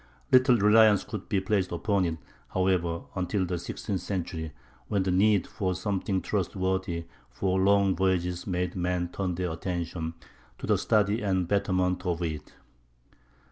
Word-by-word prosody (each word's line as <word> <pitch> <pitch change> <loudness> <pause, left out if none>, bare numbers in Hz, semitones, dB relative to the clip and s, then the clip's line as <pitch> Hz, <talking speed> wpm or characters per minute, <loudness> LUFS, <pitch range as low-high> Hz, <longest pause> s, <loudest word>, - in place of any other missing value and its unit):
Little 130 -1 +6
reliance 105 0 +5
could - - -7
be 100 - +2
placed 95 -1 0
upon 100 +2 +1
it, 80 -1 -2 0.4
however, 90 -3 +1
until 95 +1 -1
the 90 -1 -3
sixteenth 95 +2 -4
century, 85 -4 -4 0.4
when 100 +5 +1
the 95 - 0
need 100 0 +3
for 95 -2 -2
something 95 -1 -1
trustworthy 95 -3 -1 0.2
for 95 -1 -1
long 100 0 +4
voyages 90 -2 0
made 90 -1 -1
men 90 -1 -1
turn 90 -1 -2
their 90 -1 -2
attention 85 -1 -4 0.4
to - - -6
the - - +2
study 105 +1 +2
and 95 -4 0
betterment 90 -2 +1
of 90 -2 -1
it. 80 -3 -5
95 Hz, 145 wpm, -28 LUFS, 90-100 Hz, 0.4 s, Little